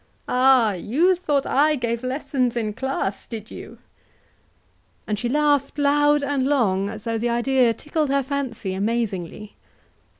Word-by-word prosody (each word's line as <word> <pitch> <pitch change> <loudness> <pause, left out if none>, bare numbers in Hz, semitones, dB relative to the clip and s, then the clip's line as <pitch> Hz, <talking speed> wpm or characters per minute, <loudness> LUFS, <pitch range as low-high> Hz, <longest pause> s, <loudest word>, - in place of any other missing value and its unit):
Ah! 250 -4 +4
you 280 - +2
thought 295 -6 -1
I 300 +2 +3
gave 235 -3 -2
lessons 255 -2 -1
in 215 -3 -2
class 255 -5 -3
did 220 -1 -8
you?" - - -10 1.3
And 210 -1 -2
she 240 - -2
laughed 290 0 +1
loud 290 0 +3
and 280 -2 0
long, 200 -9 +1
as 215 -1 -8
though 230 -1 -2
the 240 +2 -1
idea 240 +1 +2
tickled 300 +3 -2
her 275 0 +1
fancy 255 -8 -4
amazingly. 210 -1 -3
255 Hz, 140 wpm, -22 LUFS, 220-285 Hz, 1.3 s, Ah